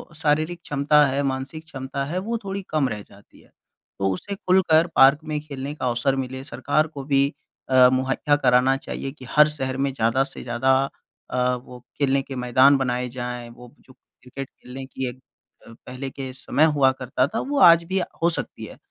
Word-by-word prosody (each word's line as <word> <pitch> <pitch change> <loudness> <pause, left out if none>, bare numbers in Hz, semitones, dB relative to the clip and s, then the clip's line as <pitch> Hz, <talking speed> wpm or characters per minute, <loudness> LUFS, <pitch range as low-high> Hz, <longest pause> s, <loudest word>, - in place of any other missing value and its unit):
शारीरिक 155 +2 0
क्षमता 145 +1 +3
है, 135 +1 -1
मानसिक 135 +3 -4
क्षमता 135 -2 -5
है, 160 +6 -4
वो 230 +5 -3
थोड़ी 195 0 -4
कम 150 -4 +1
रह 105 -2 -5
जाती 100 0 -20
है। - - -24 0.5
तो 95 0 +1
उसे 200 - -6
खुलकर 180 -4 +3
पार्क 135 +2 +6
में 155 -1 -3
खेलने 140 -1 -6
का 130 - -4
अवसर 120 +3 +1
मिले, 130 0 -4
सरकार 145 +3 0
को 145 -3 -8
भी 140 0 +1 0.4
अ, 130 -1 +7
मुहैया 135 +3 +1
कराना 130 -1 +3
चाहिए 135 0 -6
कि 135 -2 -13
हर 150 0 +6
शहर 130 -3 -3
में 135 0 0
ज़्यादा 115 +2 +1
से - - -9
ज़्यादा 120 +2 0 0.6
अ, 125 0 +1
वो 125 -1 -12 0.2
खेलने 140 -1 +2
के 135 0 -8
मैदान 130 +3 +4
बनाए 125 -1 -1
जाएँ, 120 -1 -6
वो 120 0 -14
जो 130 - -19
क्रिकेट 130 +1 -11
खेलने 130 +2 -10
की 130 0 -5
एक 125 +1 -11 0.5
अ, - - -12
पहले 130 +2 -6
के 130 -1 -7
समय 140 +3 +1
हुआ 135 -2 +5
करता 130 0 -1
था, 225 +10 -3
वो 285 +1 -2
आज 170 -6 +7
भी 190 +3 -1
अ, - - -1 0.2
हो 170 - +5
सकती 165 - -5
है। - - -12
135 Hz, 195 wpm, -23 LUFS, 130-150 Hz, 0.6 s, अ